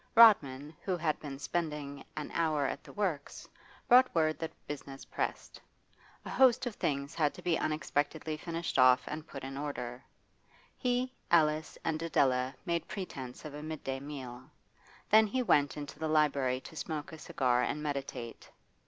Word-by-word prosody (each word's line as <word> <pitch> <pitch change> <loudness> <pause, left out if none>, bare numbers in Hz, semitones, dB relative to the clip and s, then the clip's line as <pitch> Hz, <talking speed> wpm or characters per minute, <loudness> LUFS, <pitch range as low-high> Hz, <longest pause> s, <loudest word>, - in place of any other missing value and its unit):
Rodman, 150 - +6
who 185 -2 -1
had 155 -2 0
been 140 -3 -6
spending 150 -3 -3
an 150 - -4
hour 155 -4 +1
at 135 - -3
the - - -12
works, 180 -9 -3 0.4
brought 255 -2 +6
word 155 -1 +2
that 160 - -3
business 140 -2 -7
pressed; - - -4 0.6
a - - -6
host 255 -1 +5
of 245 - -2
things 140 -6 -2
had 150 -3 +1
to - - -11
be 175 -2 +2
unexpectedly 155 0 -1
finished 165 -1 -3
off 130 0 +7
and 155 +1 -5
put 135 - -8
in 135 0 -5
order. 125 -4 -5 0.7
He, 250 +1 0 0.2
Alice, 155 -2 +3
and 160 -1 0
Adela 130 -5 +2
made 170 -2 -1
pretence 135 -12 -6
of 150 - -7
a 150 - -6
midday 150 -4 -4
meal; 130 -3 -8 0.6
then 220 +1 +7
he 255 +5 0
went 145 -11 +3
into 145 0 -7
the 160 - -1
library 140 -5 +2
to 160 - -11
smoke 155 -1 -4
a 160 - -9
cigar 125 -3 +1
and 150 +5 -1
meditate. 135 -5 -5
150 Hz, 160 wpm, -32 LUFS, 140-165 Hz, 0.7 s, off